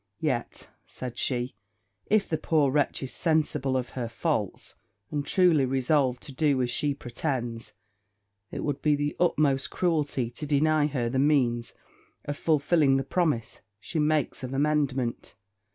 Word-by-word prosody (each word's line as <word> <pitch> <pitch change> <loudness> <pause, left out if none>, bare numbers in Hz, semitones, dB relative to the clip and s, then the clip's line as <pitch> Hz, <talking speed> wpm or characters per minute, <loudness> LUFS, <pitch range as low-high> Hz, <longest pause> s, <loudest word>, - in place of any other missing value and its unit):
'Yet,' 130 -7 -2 0.2
said 125 -1 -7
she, 125 -1 -1 0.5
'if 210 -1 +2
the 160 - -1
poor 150 -4 +2
wretch 145 -1 0
is 130 - -4
sensible 150 -5 +1
of 125 -1 -3
her 120 -3 -4
faults, 115 - -2 0.4
and 145 -1 -1
truly 170 -2 +4
resolved 130 0 +1
to 140 - -9
do 145 -1 +2
as 120 - -1
she 145 +3 0
pretends, 120 -3 -4 0.8
it - - -5
would 145 -2 -2
be 150 -1 +3
the 145 0 -2
utmost 145 -6 +2
cruelty 145 -8 0
to 150 +5 -6
deny 150 +1 +3
her 130 -5 -1
the 130 +3 0
means 125 -5 +2 0.5
of 145 - -3
fulfilling 150 -2 +3
the 135 - 0
promise 150 -6 -1 0.2
she 160 - -4
makes 150 -1 +1
of 130 +1 -5
amendment. 135 -6 0
140 Hz, 150 wpm, -27 LUFS, 125-150 Hz, 0.8 s, truly